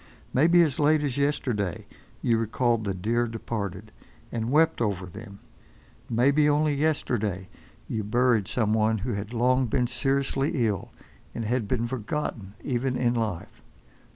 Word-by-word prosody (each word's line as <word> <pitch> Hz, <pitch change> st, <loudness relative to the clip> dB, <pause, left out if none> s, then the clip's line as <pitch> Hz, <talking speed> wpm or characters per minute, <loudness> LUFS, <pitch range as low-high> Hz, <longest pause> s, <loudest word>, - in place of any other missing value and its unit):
Maybe 170 Hz, +5 st, +5 dB
as 150 Hz, -5 st, -1 dB
late 150 Hz, 0 st, +4 dB
as 135 Hz, -4 st, -1 dB
yesterday 125 Hz, -, -1 dB, 0.4 s
you 115 Hz, -2 st, +3 dB
recalled 115 Hz, 0 st, 0 dB
the 100 Hz, -, -1 dB
dear 115 Hz, +6 st, 0 dB
departed, 105 Hz, -3 st, -5 dB, 0.4 s
and 115 Hz, 0 st, -2 dB
wept 155 Hz, -1 st, +3 dB
over 100 Hz, -5 st, -1 dB
them. 100 Hz, +3 st, -10 dB, 0.7 s
Maybe 140 Hz, +6 st, +3 dB
only 150 Hz, +1 st, +2 dB
yesterday 120 Hz, -, -1 dB, 0.4 s
you 110 Hz, -1 st, -2 dB
buried 115 Hz, -1 st, +2 dB
some 110 Hz, -3 st, 0 dB
one 110 Hz, 0 st, +2 dB
who 120 Hz, +5 st, -3 dB
had 100 Hz, +2 st, -4 dB
long 125 Hz, +2 st, +2 dB
been 125 Hz, +2 st, +1 dB
seriously 135 Hz, +1 st, 0 dB
ill, 100 Hz, -5 st, -2 dB, 0.5 s
and 115 Hz, -, -3 dB
had 120 Hz, -1 st, 0 dB
been 120 Hz, +1 st, 0 dB
forgotten 115 Hz, -4 st, -4 dB
even 130 Hz, 0 st, -1 dB
in 120 Hz, -1 st, +2 dB
life. 110 Hz, -7 st, -3 dB
120 Hz, 145 wpm, -26 LUFS, 105-135 Hz, 0.7 s, Maybe